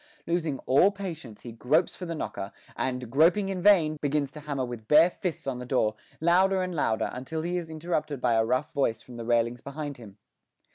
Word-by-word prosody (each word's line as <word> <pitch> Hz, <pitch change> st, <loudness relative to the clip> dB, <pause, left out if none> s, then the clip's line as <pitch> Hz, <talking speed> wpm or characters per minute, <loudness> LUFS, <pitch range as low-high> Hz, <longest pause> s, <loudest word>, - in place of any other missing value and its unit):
Losing 165 Hz, -5 st, -1 dB
all 140 Hz, +9 st, +5 dB
patience, 165 Hz, -, -7 dB
he 120 Hz, -, -8 dB
gropes 140 Hz, +9 st, +1 dB
for 180 Hz, -, -7 dB
the 165 Hz, -, -3 dB
knocker, 100 Hz, -8 st, -5 dB, 0.2 s
and, 125 Hz, -1 st, -2 dB
groping 170 Hz, +8 st, +4 dB
in 190 Hz, -2 st, -3 dB
vain, 170 Hz, -6 st, +5 dB
begins 145 Hz, -1 st, 0 dB
to 150 Hz, -, -9 dB
hammer 145 Hz, -3 st, -3 dB
with 120 Hz, -3 st, -8 dB
bare 160 Hz, +6 st, +6 dB
fists 175 Hz, -4 st, -4 dB
on 130 Hz, -2 st, -3 dB
the -, -, -5 dB
door, 110 Hz, -4 st, +2 dB, 0.3 s
louder 185 Hz, +3 st, +3 dB
and 180 Hz, 0 st, -3 dB
louder, 115 Hz, -8 st, 0 dB
until 145 Hz, +6 st, -4 dB
he 175 Hz, +1 st, -2 dB
is 170 Hz, -2 st, -3 dB
interrupted 155 Hz, -3 st, -2 dB
by 125 Hz, -2 st, +2 dB
a 115 Hz, 0 st, +3 dB
rough 125 Hz, +5 st, -1 dB
voice 115 Hz, -5 st, 0 dB
from 125 Hz, -2 st, -11 dB
the 115 Hz, -, -6 dB
railings 120 Hz, 0 st, +1 dB
behind 145 Hz, 0 st, -6 dB
him. 105 Hz, -4 st, -13 dB
145 Hz, 205 wpm, -27 LUFS, 125-170 Hz, 0.3 s, bare